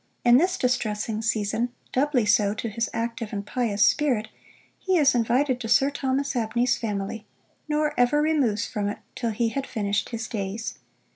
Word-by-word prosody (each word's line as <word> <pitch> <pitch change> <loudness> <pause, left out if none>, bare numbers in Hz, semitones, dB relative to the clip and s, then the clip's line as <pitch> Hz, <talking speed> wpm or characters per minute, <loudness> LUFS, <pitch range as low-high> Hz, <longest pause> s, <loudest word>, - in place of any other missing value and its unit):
In 240 0 +7
this 360 +3 +1
distressing 220 -3 -1
season, 225 +1 0 0.2
doubly 265 -3 +2
so 210 0 +3
to 225 +2 -3
his 225 +2 -2
active 230 -1 -3
and 200 -1 -4
pious 210 -2 +1
spirit, 255 -8 +1 0.5
he 375 -1 +1
is 290 -4 +5
invited 250 +3 +1
to 225 - -5
Sir 270 +5 +4
Thomas 275 0 -1
Abney's 240 +1 +1
family, 210 -1 -4 0.4
nor 300 0 0
ever 245 +4 +4
removes 285 -9 +1
from 205 -1 -2
it 205 - -4 0.2
till 235 - -2
he 225 +1 0
had 275 +3 -4
finished 205 -1 -1
his 225 -2 -4
days. 210 +1 -4
230 Hz, 165 wpm, -25 LUFS, 210-265 Hz, 0.5 s, In